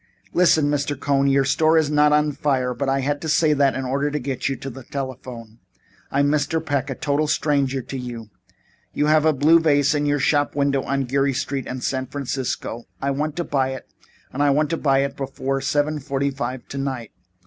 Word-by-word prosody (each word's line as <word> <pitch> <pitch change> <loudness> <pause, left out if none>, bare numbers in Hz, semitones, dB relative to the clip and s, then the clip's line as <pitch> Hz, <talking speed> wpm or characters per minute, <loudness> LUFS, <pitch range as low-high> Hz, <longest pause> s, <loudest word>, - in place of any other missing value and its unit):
"Listen, 165 -4 +4
Mr. 145 -1 -1
Cohn. 140 -1 +1
Your 135 0 +3
store 155 +3 +3
is 155 -2 +2
not 150 0 +4
on 150 0 +3
fire, 130 -3 0
but 135 +3 -2
I 135 0 +1
had 145 +2 -1
to 160 - -4
say 155 0 +3
so 140 -1 +3
in 130 -1 -2
order 140 +3 0
to 150 - -2
get 135 -2 -2
you 135 - -1
to 135 - -7
the 130 +2 -10
telephone. 125 -4 -7 0.5
I 140 - +1
am 145 - +3
Mr. 150 +2 +1
Peck, 140 -2 -1
a 135 - -3
total 145 +3 0
stranger 140 -4 0
to 135 - -6
you. 120 -3 -7 0.6
You 150 - +1
have 155 0 +4
a 160 - +5
blue 155 +4 +5
vase 145 -2 +3
in 145 -1 0
your 145 0 +2
shop 145 +1 +1
window 140 -1 +1
on 135 +1 -1
Geary 135 +2 +1
Street 135 -1 -3
in 130 0 -5
San 130 +1 -2
Francisco. 130 -3 -4
I 140 - -1
want 150 +2 -2
to 175 - -1
buy 135 -4 0
it 130 - -9 0.5
and 140 - -2
I 145 - +4
want 150 +3 +2
to 165 - 0
buy 135 -2 +2
it 140 0 -3
before 135 0 -3
seven 150 +1 0
forty 140 0 -1
five 130 -2 -5
tonight. 135 -5 -4
140 Hz, 215 wpm, -22 LUFS, 135-145 Hz, 0.6 s, a